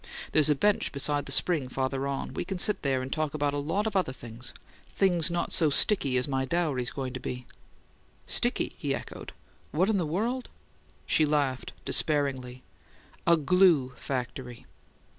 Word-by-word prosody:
"There's 155 -1 +4
a 150 - +4
bench 205 +8 +1
beside 145 0 +2
a - - 0
spring 145 -3 +2
farther 135 +1 -2
on; 140 -1 -4
we - - -3
can 190 +1 -4
sit 210 +4 +2
there 135 -2 0
and 130 - -4
talk 155 -1 -2
about 145 -1 0
a 145 - -1
lot 165 +9 -1
of 190 -11 -1
things 120 +1 -8 0.4
things 180 -4 +4
not 175 0 -2
so 160 -3 +4
sticky 140 -4 +3
as 125 - +1
my 135 -1 -1
dowry's 135 -4 -1
going 130 -2 -5
to - - -5
be." 125 0 -6 0.8
"'Sticky?'" - - +2
he - - -1
echoed. - - -8 0.4
"What 180 +7 +1
in 210 - +1
the 170 - -1
world 230 +10 -2 0.3
" - - -34 0.2
She 155 - +2
laughed 145 -4 0
despairingly. 130 -4 0 0.6
"A 170 0 +6
glue 155 -4 +3
factory!" 125 -2 -5
145 Hz, 170 wpm, -28 LUFS, 130-170 Hz, 0.8 s, A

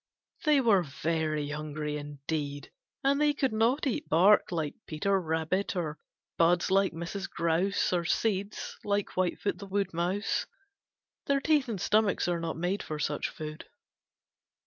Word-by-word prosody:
They 300 -3 +5
were 215 -6 +5
very 155 -1 -1
hungry 150 0 -4
indeed, 145 0 -4 0.3
and 280 +2 +3
they 295 -1 +3
could 270 -5 0
not 230 +7 +2
eat 265 - -2
bark 190 +6 +5
like 160 -4 -1
Peter 195 +5 +1
Rabbit, 160 +5 -1
or 160 -4 -3 0.4
buds 175 +2 +3
like 195 0 +4
Mrs. 170 +4 -5
Grouse, 170 +4 +1
or 175 -1 +1
seeds 200 +3 -1
like 205 -1 0
Whitefoot 185 +2 0
the 200 - -8
Woodmouse. 190 0 -1 0.8
Their 280 0 +3
teeth 290 -3 +2
and 210 -4 -3
stomachs 210 0 +2
are 175 -1 0
not 165 -1 -3
made 180 +4 -1
for 155 - -5
such 150 0 -1
food. 155 0 -7
180 Hz, 145 wpm, -29 LUFS, 155-205 Hz, 0.8 s, They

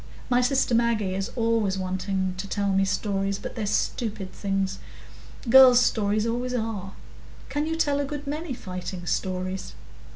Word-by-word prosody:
My 245 0 +4
sister 260 -1 +2
Maggie 230 -5 +2
is 195 +3 -2
always 225 -5 +1
wanting 185 0 -2
to 200 - -4
tell 200 +1 -1
me 195 0 +3
stories, 195 0 -1
but - - -7
they're 220 -4 -3
stupid 205 -2 -2
things. 195 -1 -2 0.7
Girls' 255 0 +8
stories 215 -3 +1
always 245 +2 -1
are. 215 -5 -3 0.6
Can 290 +3 -1
you 325 - -1
tell 290 -3 +1
a 285 - 0
good 290 +1 -6
many 300 0 -4
fighting 185 -2 -6
stories?" 185 +1 -3
210 Hz, 155 wpm, -26 LUFS, 190-245 Hz, 0.7 s, Girls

